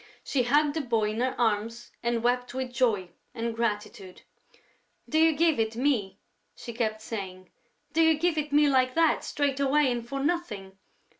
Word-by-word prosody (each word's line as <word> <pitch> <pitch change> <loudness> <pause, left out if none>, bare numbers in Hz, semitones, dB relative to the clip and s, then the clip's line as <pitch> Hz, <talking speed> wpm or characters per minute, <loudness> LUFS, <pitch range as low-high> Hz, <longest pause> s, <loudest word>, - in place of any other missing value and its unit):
She 270 - 0
hugged 290 +4 +2
the 320 - -1
boy 225 -5 0
in 220 - -4
her 255 +1 -1
arms 230 +1 -1
and 235 -1 -1
wept 245 +1 0
with 260 -1 -4
joy 215 -8 +1 0.2
and 230 -1 -3
gratitude: 210 -4 -4 0.8
"Do 315 - +1
you 325 0 +5
give 320 -3 +2
it 220 0 0
me?" 230 -7 0 0.4
she 240 -1 -8
kept 220 -2 -2
saying. 185 -5 -7 0.4
"Do 330 - +3
you 320 -1 +4
give 340 +1 +1
it 300 -1 -2
me 295 +1 +5
like 255 -2 +2
that, 330 -1 +3
straight 280 -2 -1
away 280 0 +3
and 240 -1 -2
for 275 +4 -5
nothing?... 230 - -3
245 Hz, 175 wpm, -27 LUFS, 220-290 Hz, 0.8 s, you